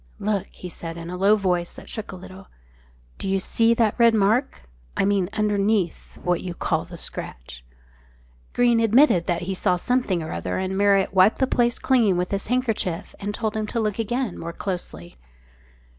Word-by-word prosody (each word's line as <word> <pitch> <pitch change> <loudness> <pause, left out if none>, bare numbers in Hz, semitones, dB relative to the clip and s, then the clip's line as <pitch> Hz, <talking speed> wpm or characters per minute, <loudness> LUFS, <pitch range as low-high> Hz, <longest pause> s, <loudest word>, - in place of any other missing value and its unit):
"Look," 200 -2 -1
he 180 - -10
said, 165 -1 -7
in 170 +1 -7
a - - -4
low 200 +3 +4
voice 180 -4 -1
that - - -12
shook 220 - -4
a - - -7
little. 185 +1 -12 0.7
"Do - - -3
you 195 0 +1
see 230 +4 +2
that 225 -3 +2
red 230 -1 +6
mark? 220 +6 +1 0.4
I - - +2
mean 195 -2 +1
underneath 205 -3 0
what 180 -1 +1
you 180 -2 -5
call - - -1
the - - -10
scratch?" - - -6 0.9
Greene 240 -1 +3
admitted 225 - +4
he 175 +2 -1
saw 180 -1 +1
something 190 -3 0
or 155 - -6
other, 90 +2 -3
and 190 0 -2
Marriott 200 -1 +3
wiped 190 +3 +5
the 265 - +2
place 240 -2 +1
clean 230 -8 +2
with 180 0 -2
his 195 -1 -2
handkerchief 220 -7 -1
and 205 +1 -3
told 220 0 -3
him 215 -1 -2
to 230 - -2
look 215 -1 -1
again 240 -1 -2
more 170 0 -5
closely. 170 - -6
195 Hz, 185 wpm, -23 LUFS, 180-225 Hz, 0.9 s, red